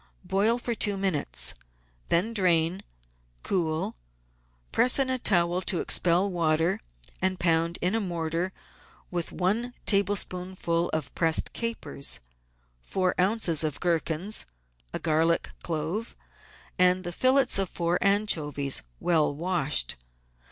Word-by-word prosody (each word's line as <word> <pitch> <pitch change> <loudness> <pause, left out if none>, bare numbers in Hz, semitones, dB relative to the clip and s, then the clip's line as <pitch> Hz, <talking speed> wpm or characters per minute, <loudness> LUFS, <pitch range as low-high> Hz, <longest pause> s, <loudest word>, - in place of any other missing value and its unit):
Boil 215 +5 +2
for 240 0 -2
two 205 -3 +2
minutes, 160 - 0 0.6
then 190 +7 +1
drain, 180 -2 +1 0.6
cool, 160 -4 -1 0.8
press 250 - +4
in 270 -2 +1
a 255 - 0
towel 175 -4 +2
to 185 -2 +2
expel 180 +3 +3
water, 165 -1 +1 0.4
and 185 0 0
pound 165 0 +1
in 180 +3 +2
a 225 - +1
mortar 170 -2 -2 0.6
with 175 -2 -2
one 225 +7 -1
tablespoonful 185 -4 +1
of 155 -5 -3
pressed 165 -2 +1
capers, 230 -11 0 0.6
four 185 - -1
oz. 185 -5 +2
of 150 -3 -2
gherkins, 170 +3 0 0.4
a - - -3
garlic 165 +1 +1
clove, 170 +7 -3 0.6
and 180 0 +4
the 175 - -4
fillets 260 0 +3
of 195 -3 0
four 170 +1 -1
anchovies 155 -9 +1 0.2
well 155 -4 +2
washed. 155 - +1
180 Hz, 115 wpm, -27 LUFS, 165-200 Hz, 0.8 s, press